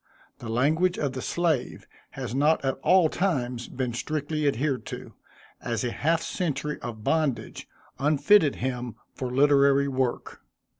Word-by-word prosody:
The 115 - -7
language 155 +10 +2
of 140 -3 -1
the 130 - -5
slave 165 -5 -1 0.3
has - - -4
not 145 +2 +2
at 135 0 -1
all 185 -3 +5
times 130 -10 -1
been 125 -2 -3
strictly 150 +3 -2
adhered 135 0 0
to, - - -8 0.5
as 120 +1 -2
a 120 - -1
half 165 +5 0
century 150 -4 -3
of 110 -3 -7
bondage 140 -8 -1 0.3
unfitted 150 +3 +4
him 125 -2 -4 0.2
for 130 - -4
literary 140 +1 +4
work. 130 -2 -2
140 Hz, 140 wpm, -26 LUFS, 125-155 Hz, 0.5 s, all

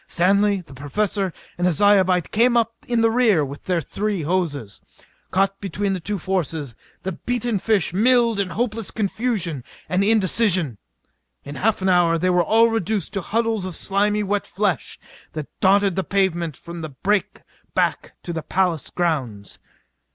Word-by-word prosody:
Stanley, 200 +2 +2
the 165 -5 -15
Professor 190 +8 -1 0.3
and 180 - +2
a - - +3
Zyobite 190 -1 +3
came 240 +2 +3
up 230 0 +1
in 240 -2 +1
the 225 0 +3
rear 220 -10 +3
with 140 +1 -9
their 180 -2 +1
three 200 +3 -3
hoses. 145 - -2 0.5
Caught 195 +1 0
between 195 +1 -2
the 185 - -2
two 205 +5 -3
forces, 160 -7 -2 0.3
the 190 - -2
beaten 240 +3 -2
fish 200 -4 +1
milled 230 +1 +3
in 195 -2 0
hopeless 220 +3 -2
confusion 200 - -2 0.2
and 185 +2 +1
indecision. 190 - +2 0.6
In 140 - -8
half 205 +5 0
an 190 - +2
hour 175 -2 +4
they 185 +2 +1
were 180 0 +3
all 225 +5 +4
reduced 215 -4 -1
to 195 - -1
huddles 225 +1 -1
of 185 -2 -5
slimy 205 +1 +1
wet 205 0 -1
flesh 195 -3 -1 0.4
that 155 -2 -4
dotted 195 -1 +3
the 190 - 0
pavement 175 -6 0
from 170 -1 -8
the 155 - -5
break 195 +9 -1 0.3
back - - 0
to 170 - -4
the 165 - -3
palace 175 0 0
grounds. 130 - -2
190 Hz, 165 wpm, -22 LUFS, 170-210 Hz, 0.6 s, hour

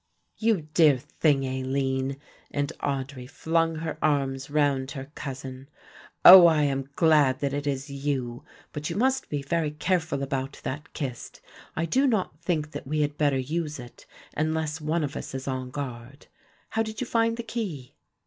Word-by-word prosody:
"You 220 -7 +1
dear 155 -5 +6
thing, 145 0 +1
Aline," 130 +1 -1 0.3
and 145 -1 -2
Audry 135 -2 -3
flung 165 +2 0
her 160 0 -4
arms 135 -2 0
round 145 -3 +1
her 135 0 -7
cousin. 135 -1 -7 0.6
"Oh, 180 -1 +12
I 155 -3 +3
am 135 -1 -1
glad 150 -6 +4
that 140 -1 0
it 145 0 -2
is 140 0 -2
you, 135 -4 -3 0.3
but 150 0 -4
you 165 - -3
must 260 +5 +1
be 145 -2 -2
very 160 +2 0
careful 160 -1 -1
about 135 0 -3
that 145 +4 -5
kist; 130 -5 -5 0.4
I 165 - 0
do 265 - +2
not 190 - 0
think 160 -4 -1
that - - -7
we 150 +2 0
had 145 0 0
better 145 -3 +2
use 150 +3 -2
it 120 -2 -12 0.3
unless 155 0 -1
one 155 +2 0
of 145 -1 -3
us - - -6
is 135 0 -5
on 130 -1 -3
guard. 130 0 -7 0.4
How 225 - 0
did 220 -1 -4
you 255 - -1
find 230 -1 +1
the 235 - -4
key?" 205 - -5
145 Hz, 170 wpm, -26 LUFS, 135-165 Hz, 0.6 s, Oh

